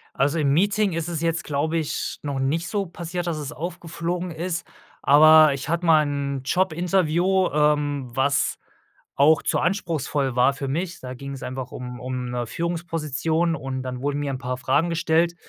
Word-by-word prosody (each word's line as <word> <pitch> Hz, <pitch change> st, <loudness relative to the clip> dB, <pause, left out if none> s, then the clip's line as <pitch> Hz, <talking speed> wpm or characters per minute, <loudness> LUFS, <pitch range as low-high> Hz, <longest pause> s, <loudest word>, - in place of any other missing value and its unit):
Also, 145 Hz, +4 st, +1 dB
im 140 Hz, -3 st, +2 dB
Meeting 200 Hz, +5 st, +2 dB
ist 165 Hz, 0 st, -2 dB
es 165 Hz, -3 st, -3 dB
jetzt, 165 Hz, 0 st, -1 dB
glaube 155 Hz, +3 st, -1 dB
ich, 155 Hz, -3 st, -3 dB
noch 140 Hz, -2 st, -3 dB
nicht 155 Hz, +6 st, -1 dB
so 200 Hz, -2 st, -1 dB
passiert, 175 Hz, +1 st, -5 dB
dass 170 Hz, -2 st, -1 dB
es 150 Hz, -1 st, -5 dB
aufgeflogen 175 Hz, +1 st, -4 dB
ist, 165 Hz, +1 st, -4 dB, 0.4 s
aber 155 Hz, +1 st, +7 dB
ich 135 Hz, +1 st, -6 dB
hatte 170 Hz, +2 st, -1 dB
mal 160 Hz, -2 st, +6 dB
'n 140 Hz, -2 st, -3 dB
Jobinterview, 180 Hz, +2 st, +2 dB
ähm, 145 Hz, -2 st, +1 dB
was, 140 Hz, +2 st, +1 dB, 0.6 s
auch 145 Hz, +2 st, +4 dB
zu -, -, +1 dB
anspruchsvoll 155 Hz, -8 st, -1 dB
war 125 Hz, +2 st, +4 dB
für 140 Hz, 0 st, -5 dB
mich. 175 Hz, +5 st, -3 dB
Da 125 Hz, 0 st, -7 dB
ging's 140 Hz, +1 st, -7 dB
einfach 130 Hz, 0 st, -5 dB
um 125 Hz, 0 st, -7 dB
um, 125 Hz, -1 st, -4 dB
'ne 120 Hz, -1 st, -3 dB
Führungsposition 165 Hz, 0 st, -1 dB
und 135 Hz, -3 st, -4 dB
dann 125 Hz, -1 st, -5 dB
wurden 145 Hz, +1 st, -1 dB
mir 145 Hz, -1 st, -2 dB
'n 130 Hz, -, -4 dB
paar 125 Hz, -1 st, -3 dB
Fragen 150 Hz, +6 st, +1 dB
gestellt, 165 Hz, +1 st, +1 dB
155 Hz, 175 wpm, -24 LUFS, 140-170 Hz, 0.6 s, aber